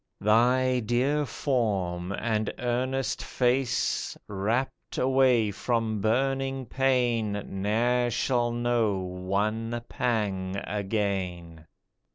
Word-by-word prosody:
Thy 125 +4 +3
dear 130 +6 +1
form 100 -9 -1
and 110 0 -1
earnest 125 +2 -1
face, 125 0 0
Wrapt 110 +7 -2
away 130 -4 +3
from 110 0 -1
burning 135 +3 0
pain, 120 -4 +1
Ne'er 115 +5 +1
shall 120 0 +1
know 120 -4 +1
one 100 +5 -2
pang 100 -7 -1
again. 95 -6 -3
115 Hz, 85 wpm, -27 LUFS, 100-125 Hz, -, Thy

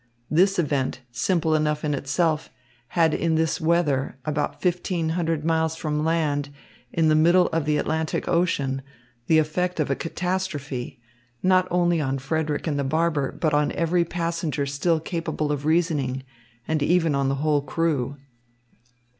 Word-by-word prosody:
This 190 +5 +4
event, 140 -6 0
simple 160 +6 +1
enough 150 0 +1
in 150 - 0
itself, 155 +3 0 0.5
had 165 -2 +4
in 165 -1 +1
this 160 +2 0
weather, 155 -6 +1
about 150 -1 -2
fifteen 175 -2 0
hundred 165 -2 -1
miles 160 -1 +1
from 150 -2 -2
land, 150 -3 0 0.4
in 165 -1 +2
the 155 - +4
middle 170 +4 +5
of 165 -2 -1
the 150 -1 +2
Atlantic 160 +1 -1
Ocean, 140 -6 +1 0.5
the 160 - +5
effect 170 +3 0
of 145 -2 0
a - - +2
catastrophe, 160 -9 -3 0.4
not 185 0 +4
only 175 -2 +2
on 135 -1 -1
Frederick 150 +2 -2
and 150 -3 -1
the - - 0
barber, 155 0 0
but 155 -3 -1
on 150 0 +2
every 170 +1 +1
passenger 165 -3 -2
still 150 +4 +1
capable 160 -2 -3
of 145 0 -2
reasoning, 150 -6 +1 0.4
and 160 -1 0
even 165 0 +3
on 140 -1 +1
the 135 - 0
whole 150 +1 +1
crew. 145 -2 -1
160 Hz, 155 wpm, -24 LUFS, 145-170 Hz, 0.5 s, middle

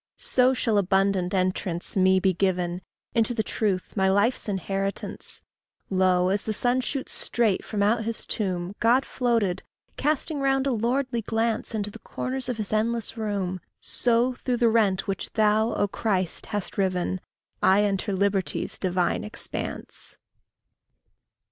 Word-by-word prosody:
SO 255 +1 +3
shall 220 -4 +2
abundant 190 -1 +2
entrance 185 -2 -1
me 190 -1 +4
be 190 0 +2
given 180 -1 0 0.3
Into 230 +1 +2
the 220 - +1
truth, 195 -5 -2
my 190 -2 +3
life's 205 +4 +2
inheritance. 195 +1 -3 0.5
Lo! 185 -1 +3
as 200 +2 +1
the 220 - -1
sun 250 +1 +2
shoots 265 +1 -3
straight 225 -5 +1
from 205 -2 -1
out 225 +3 +2
his 230 0 -3
tomb, 185 -3 -2
God 245 +4 +4
floated, 225 -7 0 0.4
casting 300 +1 0
round 270 0 +2
a 275 - +1
lordly 240 +1 0
glance 225 +1 -1
Into 210 -1 -2
the - - -11
corners 260 0 -4
of 245 - -2
his 215 -1 -3
endless 225 +1 0
room, 200 -5 -2 0.2
So, 240 +1 +2
through 245 0 -2
the 235 -1 +4
rent 210 -4 +2
which 195 - -3
thou, 220 +1 +3
O 205 - +1
Christ, 190 -3 -2
hast 205 -1 -4
riven, 185 -1 0 0.4
I 195 +2 +5
enter 200 0 0
liberty's 195 -4 0
divine 180 -2 0
expanse. 215 +2 -5
205 Hz, 145 wpm, -26 LUFS, 190-235 Hz, 0.5 s, I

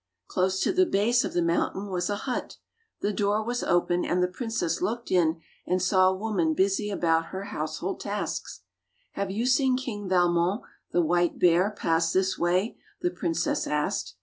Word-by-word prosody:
Close 185 +1 0
to - - +1
the 370 0 +4
base 235 +3 +2
of - - -4
the 175 - +1
mountain 175 +4 0
was 180 0 -1
a 205 - 0
hut. 255 -2 -3 0.4
The 205 - 0
door 205 +1 +1
was 245 +2 -2
open, 175 0 +1
and 180 +1 +1
the - - +3
princess 225 -2 -2
looked 230 +6 -2
in 170 -3 +2 0.3
and 185 - +1
saw 185 0 +4
a 190 - -1
woman 190 -7 0
busy 195 +3 +1
about 165 -4 +1
her 190 +1 -6
household 160 -1 -4
tasks. 205 +1 -4 0.5
"Have 200 -1 -3
you 215 +5 -1
seen 255 0 +3
King 205 -7 -5
Valmon, 175 +2 +2 0.3
the 175 - +2
white 175 +1 +1
bear, 180 +3 +4
pass 165 -5 0
this 190 0 +2
way?" 180 +6 0 0.2
the 175 - 0
princess 170 -2 -1
asked. 150 0 -1
185 Hz, 175 wpm, -27 LUFS, 175-210 Hz, 0.5 s, the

